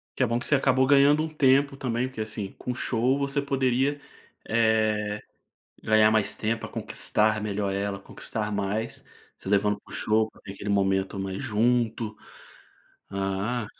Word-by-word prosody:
Que 130 Hz, -, +1 dB
é -, -, +5 dB
bom 115 Hz, 0 st, 0 dB
que -, -, -4 dB
você 145 Hz, -, +4 dB
acabou 130 Hz, -1 st, +3 dB
ganhando 145 Hz, +2 st, +5 dB
um 160 Hz, -, -3 dB
tempo 140 Hz, -1 st, +3 dB
também, 125 Hz, -1 st, -1 dB
porque, 120 Hz, -4 st, -6 dB
assim, 105 Hz, -2 st, -4 dB
com 125 Hz, -, -4 dB
show 125 Hz, +2 st, 0 dB
você 140 Hz, +1 st, 0 dB
poderia, 135 Hz, +1 st, 0 dB, 0.5 s
eh, 110 Hz, -2 st, +1 dB, 0.6 s
ganhar 110 Hz, 0 st, +5 dB
mais 110 Hz, -2 st, +2 dB
tempo 115 Hz, +1 st, -1 dB
pra -, -, -5 dB
conquistar 110 Hz, 0 st, 0 dB
melhor 100 Hz, -1 st, -2 dB
ela, 100 Hz, 0 st, -2 dB
conquistar 105 Hz, +2 st, -4 dB
mais, 100 Hz, +2 st, -3 dB, 0.3 s
você -, -, -10 dB
levando 105 Hz, 0 st, +2 dB
para -, -, -16 dB
o -, -, -6 dB
show 110 Hz, 0 st, +1 dB
para -, -, -21 dB
ter 95 Hz, -, -8 dB
aquele 100 Hz, +1 st, -5 dB
momento 95 Hz, 0 st, +1 dB
mais 95 Hz, 0 st, -4 dB
junto. 115 Hz, -1 st, 0 dB, 0.9 s
Ah, 100 Hz, +4 st, -2 dB
110 Hz, 165 wpm, -26 LUFS, 105-130 Hz, 0.9 s, é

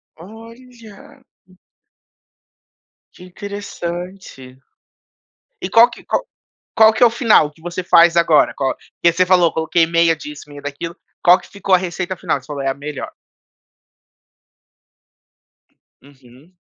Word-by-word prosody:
Olha. 225 Hz, +4 st, -15 dB, 1.9 s
Que 180 Hz, -, -15 dB
interessante. 180 Hz, -7 st, -8 dB, 1.0 s
E 185 Hz, -, -4 dB
qual 230 Hz, +4 st, +6 dB
que -, -, -14 dB, 0.7 s
qual 220 Hz, 0 st, +6 dB
que 220 Hz, -, -3 dB
é 240 Hz, -, +9 dB
o -, -, +3 dB
final 225 Hz, -, +3 dB
que 150 Hz, -, -25 dB
você 175 Hz, +1 st, -5 dB
faz 170 Hz, -1 st, +4 dB
agora? 165 Hz, -2 st, +3 dB
Qual 135 Hz, -1 st, -2 dB, 0.3 s
que 170 Hz, -, +4 dB
você 185 Hz, +2 st, +2 dB
falou, 180 Hz, -2 st, +3 dB
coloquei 160 Hz, +1 st, +1 dB
meia 165 Hz, 0 st, +2 dB
disso, 150 Hz, -1 st, -10 dB
meia 145 Hz, -1 st, -11 dB
daquilo. 145 Hz, +4 st, -6 dB, 0.3 s
Qual 180 Hz, +1 st, +6 dB
que -, -, -17 dB
ficou 195 Hz, -1 st, -1 dB
a -, -, +5 dB
receita 185 Hz, +1 st, -5 dB
final, -, -, -2 dB
que 130 Hz, -, -19 dB
você -, -, -20 dB
falou 145 Hz, -2 st, -6 dB
é 135 Hz, -, -1 dB
a 135 Hz, -, -1 dB
melhor? 145 Hz, 0 st, -7 dB, 2.9 s
Uhum. 135 Hz, +3 st, -21 dB
170 Hz, 135 wpm, -18 LUFS, 150-195 Hz, 2.9 s, é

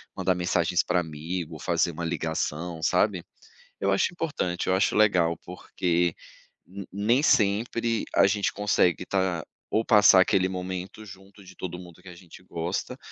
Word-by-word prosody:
mandar 95 Hz, -1 st, 0 dB
mensagens 90 Hz, -1 st, +1 dB
pra 90 Hz, 0 st, +1 dB
amigo 80 Hz, +1 st, -5 dB
ou -, -, -10 dB
fazer 85 Hz, -, 0 dB
uma 85 Hz, +2 st, -5 dB
ligação, 80 Hz, 0 st, -3 dB
sabe? 90 Hz, +1 st, +1 dB, 0.6 s
Eu 100 Hz, -, +1 dB
acho 100 Hz, -, +1 dB
importante, 145 Hz, -, -3 dB
eu 95 Hz, -, +2 dB
acho 95 Hz, -, +1 dB
legal, 90 Hz, -6 st, +3 dB
porque 85 Hz, -1 st, -2 dB, 0.5 s
ne 100 Hz, +1 st, -9 dB
nem 110 Hz, +6 st, +2 dB
sempre 115 Hz, 0 st, +1 dB
a -, -, +6 dB
gente 100 Hz, +1 st, 0 dB
consegue 100 Hz, -4 st, +1 dB
estar 95 Hz, -3 st, -1 dB, 0.3 s
ou 110 Hz, -, +1 dB
passar 105 Hz, -4 st, +7 dB
aquele 95 Hz, 0 st, +2 dB
momento 95 Hz, +2 st, -6 dB
junto 100 Hz, 0 st, -14 dB
de 90 Hz, -1 st, -15 dB
todo 90 Hz, -1 st, -5 dB
mundo 85 Hz, -2 st, -13 dB
que -, -, -17 dB
a 90 Hz, -, -11 dB
gente 85 Hz, +1 st, -15 dB
gosta, 90 Hz, +9 st, -4 dB
90 Hz, 160 wpm, -26 LUFS, 85-100 Hz, 0.6 s, passar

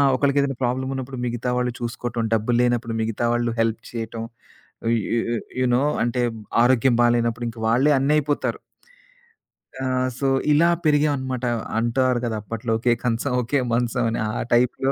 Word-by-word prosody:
ఒకళ్ళకి 140 Hz, +1 st, +2 dB
ఏదైనా 135 Hz, -2 st, -2 dB
ప్రాబ్లమున్నప్పుడు 130 Hz, +1 st, -2 dB
మిగతా 120 Hz, +1 st, -2 dB
వాళ్ళు 125 Hz, 0 st, 0 dB
చూసుకోటం, 120 Hz, 0 st, -3 dB
డబ్బులు 115 Hz, +2 st, +1 dB
లేనప్పుడు 120 Hz, -1 st, 0 dB
మిగతా 115 Hz, +1 st, -1 dB
వాళ్ళు 120 Hz, -1 st, 0 dB
హెల్ప్ 115 Hz, 0 st, +1 dB
చేయటం, 115 Hz, -1 st, -5 dB, 0.6 s
ఆ! -, -, 0 dB
యె -, -, +1 dB, 0.3 s
యె -, -, 0 dB, 0.2 s
యూ 130 Hz, -, +2 dB
నో 130 Hz, -, +2 dB, 0.2 s
అంటే 120 Hz, +1 st, 0 dB, 0.4 s
ఆరోగ్యం 125 Hz, 0 st, +3 dB
బాాలేనప్పుడు 120 Hz, 0 st, +2 dB
ఇంక 115 Hz, 0 st, -10 dB
వాళ్ళే 130 Hz, +6 st, +3 dB
అన్నయిపోతారు. 145 Hz, +1 st, 0 dB, 1.2 s
ఆ! -, -, -1 dB, 0.3 s
సో 135 Hz, -, 0 dB, 0.2 s
ఇలా 160 Hz, +3 st, +5 dB, 0.2 s
పెరిగావనమాట. 140 Hz, -4 st, +1 dB, 0.3 s
అంటారు 125 Hz, +1 st, +1 dB
కదా! 115 Hz, -2 st, -2 dB
అప్పట్లో 115 Hz, +2 st, -4 dB
ఒకే 120 Hz, 0 st, +3 dB
కంచం, 125 Hz, +2 st, 0 dB
ఒకే 135 Hz, +4 st, 0 dB
మంచం 120 Hz, +1 st, 0 dB
అని, 115 Hz, -, -2 dB
ఆ -, -, -2 dB, 0.2 s
టైప్‌లో 125 Hz, +3 st, +2 dB
120 Hz, 150 wpm, -23 LUFS, 115-130 Hz, 1.2 s, ఇలా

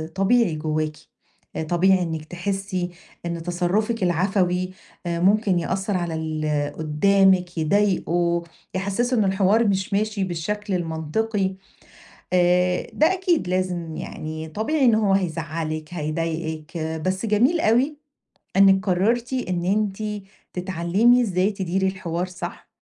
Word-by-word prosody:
طبيعي 195 Hz, -3 st, +3 dB
جواكِ، 155 Hz, 0 st, -2 dB, 0.7 s
طبيعي 185 Hz, +2 st, +4 dB
إنِك 160 Hz, -2 st, -3 dB
تحسي 185 Hz, +1 st, -3 dB, 0.4 s
إن 170 Hz, -1 st, -3 dB
تصرفِك 185 Hz, +5 st, 0 dB
العفوي 180 Hz, +1 st, +1 dB, 0.3 s
آآ 170 Hz, -1 st, -1 dB
ممكن 195 Hz, -1 st, +3 dB
يأثر 190 Hz, +3 st, -1 dB
على 170 Hz, -2 st, -2 dB
اللي 155 Hz, -2 st, -1 dB
قدامِك، 180 Hz, +4 st, +2 dB
يضايقه، 170 Hz, -1 st, +1 dB, 0.3 s
يحسسه 230 Hz, +6 st, 0 dB
إن 215 Hz, -, +4 dB
الحوار 200 Hz, +4 st, +3 dB
مش 195 Hz, 0 st, 0 dB
ماشي 210 Hz, -1 st, 0 dB
بالشكل 195 Hz, +4 st, -3 dB
المنطقي، 185 Hz, +4 st, -1 dB, 0.8 s
آآ 180 Hz, 0 st, +3 dB
ده 315 Hz, +5 st, +3 dB
أكيد 355 Hz, -, 0 dB
لازم 180 Hz, -3 st, -2 dB
يعني، 155 Hz, +1 st, -6 dB
طبيعي 245 Hz, -, 0 dB
إن 235 Hz, -3 st, +6 dB
هو 210 Hz, -3 st, +2 dB
هيزعلكِ، 160 Hz, -3 st, -2 dB
هيضايقكِ، 160 Hz, 0 st, -3 dB, 0.3 s
بس 190 Hz, +4 st, -1 dB
جميل 245 Hz, +11 st, +3 dB
أوي 255 Hz, +7 st, +2 dB, 0.6 s
إنِك 195 Hz, 0 st, +5 dB
قررتِ 230 Hz, +7 st, +1 dB
إن 185 Hz, -9 st, -1 dB
أنتِ 210 Hz, +1 st, -1 dB, 0.3 s
تتعلمي 185 Hz, +7 st, +3 dB
إزاي 195 Hz, -2 st, +1 dB
تديري 190 Hz, 0 st, -1 dB
الحوار 180 Hz, -2 st, -2 dB
صح، 185 Hz, 0 st, -7 dB
185 Hz, 115 wpm, -23 LUFS, 170-205 Hz, 0.8 s, إن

